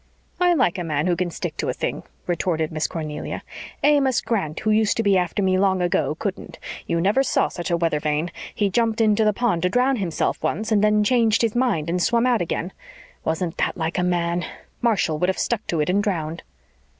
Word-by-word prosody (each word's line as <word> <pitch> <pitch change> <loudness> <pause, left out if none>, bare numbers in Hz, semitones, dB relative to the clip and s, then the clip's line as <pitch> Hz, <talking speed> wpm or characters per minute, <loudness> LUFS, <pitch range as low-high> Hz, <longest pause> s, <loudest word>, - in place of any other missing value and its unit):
"I 355 -1 +4
like 200 - +1
a - - -2
man 150 -2 -1
who 180 -1 +2
can 180 0 -1
stick 165 - -5
to - - -2
a - - 0
thing," - - -3 0.2
retorted 170 -2 -1
Miss 155 -1 -1
Cornelia. 155 -2 -5 0.4
"Amos 280 -4 +4
Grant, 165 -9 -2
who 215 - +1
used 215 0 +2
to 225 - +1
be 200 -2 +3
after 180 +2 0
me 185 0 +2
long 190 -1 +2
ago, 175 -3 0
couldn't. 195 +3 -5 0.3
You 170 - 0
never 200 +9 +3
saw 270 - +1
such 175 - -5
a 170 - +2
weather 165 -3 0
vane. 150 +3 -1 0.2
He 205 -2 +1
jumped 230 +1 +1
into 220 -1 +3
the 215 - +4
pond 210 -5 0
to 180 - +2
drown 250 +5 +2
himself 180 -6 -1
once 215 +8 -2
and 210 -1 +3
then 210 0 +4
changed 225 0 +3
his 225 -1 0
mind 235 -11 +1
and 175 +2 0
swum 235 +5 +2
out 245 -5 +2
again. 175 +1 -3 0.5
Wasn't 165 +2 -2
that - - -1
like 165 +1 -2
a - - +1
man? 175 -1 0 0.4
Marshall 200 -10 +1
would 180 - +1
have 190 - -1
stuck 235 -3 -1
to 165 - -1
it 150 - -1
and 200 +2 +2
drowned." 170 -5 -2
185 Hz, 220 wpm, -23 LUFS, 170-220 Hz, 0.5 s, I